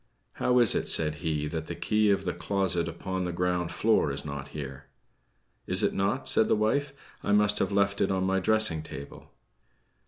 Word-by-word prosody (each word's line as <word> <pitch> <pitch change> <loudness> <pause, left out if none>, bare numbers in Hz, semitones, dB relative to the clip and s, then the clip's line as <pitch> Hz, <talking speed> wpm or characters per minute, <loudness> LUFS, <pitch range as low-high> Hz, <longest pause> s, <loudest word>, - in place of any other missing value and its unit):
"How 125 - +3
is 120 -3 +5
it," - - -1
said 75 -1 +4
he, 75 -2 -2
"that 80 +1 -5
the - - -5
key 105 0 +1
of 100 - +1
the 90 - -1
closet 85 0 0
upon 95 +2 -4
the 90 - -3
ground 90 -1 -1
floor 110 -9 +2
is 70 +1 -6
not 70 -1 -6
here." 70 -3 -8 0.8
"Is - - +2
it - - +1
not?" 100 +8 -1
said 110 - +3
the - - +3
wife. 135 +7 0 0.3
"I 105 - 0
must 105 0 +3
have - - 0
left 100 0 +1
it 95 - +2
on 95 -1 0
my 95 0 +1
dressing 110 -5 +2
table." 70 -2 -10
95 Hz, 195 wpm, -27 LUFS, 80-105 Hz, 0.8 s, is